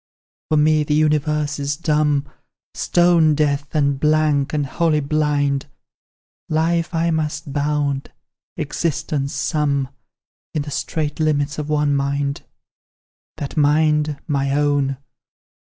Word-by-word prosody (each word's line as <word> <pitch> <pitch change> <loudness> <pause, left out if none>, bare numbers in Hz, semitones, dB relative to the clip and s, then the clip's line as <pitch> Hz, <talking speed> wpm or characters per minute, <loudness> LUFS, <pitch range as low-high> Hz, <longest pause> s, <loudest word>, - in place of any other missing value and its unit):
"For 155 - +3
me 155 0 +4
the 150 0 0
universe 150 -1 +1
is 145 0 -2
dumb, 150 -3 +1 0.5
Stone 170 -3 +3
deaf, 145 -1 0
and 140 -2 +1
blank, 150 -2 +2
and 150 -2 0
wholly 155 +2 +1
blind; 145 -1 0 0.8
Life 165 +2 0
I 165 +1 +1
must 155 -2 -2
bound, 145 -1 -1 0.5
existence 145 -3 -2
sum 140 -3 0 0.7
In 150 - 0
the 145 - -7
strait 150 +1 -3
limits 150 -1 0
of 150 0 -4
one 150 -1 +2
mind; 140 0 -1 1.0
"That 140 - -5
mind 150 0 +2
my 140 -3 0
own. 145 -2 +1
150 Hz, 115 wpm, -20 LUFS, 140-155 Hz, 1.0 s, me